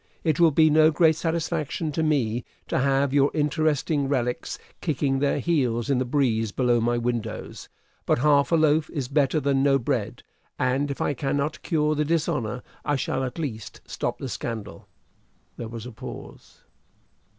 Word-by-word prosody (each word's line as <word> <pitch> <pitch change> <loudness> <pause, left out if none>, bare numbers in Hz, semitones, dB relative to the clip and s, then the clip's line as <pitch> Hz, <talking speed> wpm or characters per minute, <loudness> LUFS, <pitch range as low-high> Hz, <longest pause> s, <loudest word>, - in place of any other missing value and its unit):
It 155 -2 +1
will 170 -1 +7
be 155 +1 +4
no 155 +1 +6
great 160 0 +4
satisfaction 165 -1 -2
to 160 - -1
me 125 -7 +1 0.3
to - - +1
have 135 0 +2
your 140 0 +4
interesting 150 -1 +1
relics 125 -3 -1 0.2
kicking 140 -4 0
their 140 0 +1
heels 130 -7 0
in 130 - +2
the 130 - 0
breeze 120 -5 +1
below 120 0 +2
my 120 +1 +1
windows; 120 -1 -4 0.4
but - - +3
half 140 +3 +3
a - - +5
loaf 155 -1 +3
is 140 -6 -3
better 140 +2 +2
than 140 -2 +1
no 135 0 +4
bread, 120 - -2 0.3
and 130 +3 0
if 140 - -4
I - - +1
cannot 140 +2 -2
cure 155 -3 +1
the 150 0 0
dishonor, 150 -7 -1 0.2
I 145 - 0
shall 135 - -1
at 130 +3 -4
least 115 - -5
stop - - -3
the 135 - -5
scandal." 105 -5 -6 0.7
There 115 - -5
was 115 0 -7
a 125 - -7
pause. 110 - -11
140 Hz, 170 wpm, -25 LUFS, 125-155 Hz, 0.7 s, will